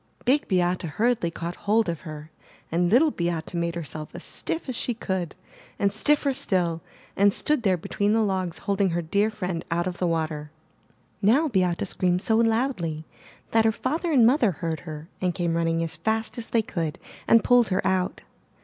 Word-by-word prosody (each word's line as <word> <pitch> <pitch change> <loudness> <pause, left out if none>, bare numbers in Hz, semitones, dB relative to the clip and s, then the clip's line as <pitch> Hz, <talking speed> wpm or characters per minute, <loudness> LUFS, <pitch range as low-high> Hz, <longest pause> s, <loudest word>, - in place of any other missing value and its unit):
Big 275 +4 +2
Beate 180 -1 +1
hurriedly 210 +3 0
caught 170 +1 -5
hold 220 +1 +3
of 170 -2 -2
her 155 -1 -9 0.4
and 175 +2 +2
Little 285 - +5
Beate 170 -4 -3
made 170 -1 -1
herself 155 -2 -6
as - - -7
stiff 325 - -2
as 255 - -3
she 240 +1 -2
could, 190 -6 -3 0.4
and 200 0 +1
stiff 290 +8 +2
er 275 - +2
still, 180 -11 0 0.3
and 200 +1 +5
stood 300 +6 0
there 190 -5 +2
between 205 +5 0
the 225 0 +3
logs 185 -4 -1
holding 200 -1 +2
her 170 0 -1
dear 200 +6 +1
friend 185 -6 -4
out 170 +1 0
of 180 -1 -4
the 180 - +1
water. 155 -2 -2 0.7
Now 270 +10 +4
Beate 180 -6 +1
screamed 180 0 0
so 220 - +2
loudly 225 - 0 0.5
that 225 0 +4
her 220 - +4
father 315 +9 -2
and 255 -6 +6
mother 240 -5 +4
heard 160 0 -3
her 155 +1 -7
and 180 -2 0
came 170 -2 0
running 165 0 +1
as 160 -1 -3
fast 220 +6 -1
as 235 -2 -5
they 230 -2 +1
could, 165 -7 -3 0.3
and 230 - +6
pulled 245 -2 +5
her 185 -1 -1
out. 190 -1 0
185 Hz, 190 wpm, -25 LUFS, 170-225 Hz, 0.7 s, and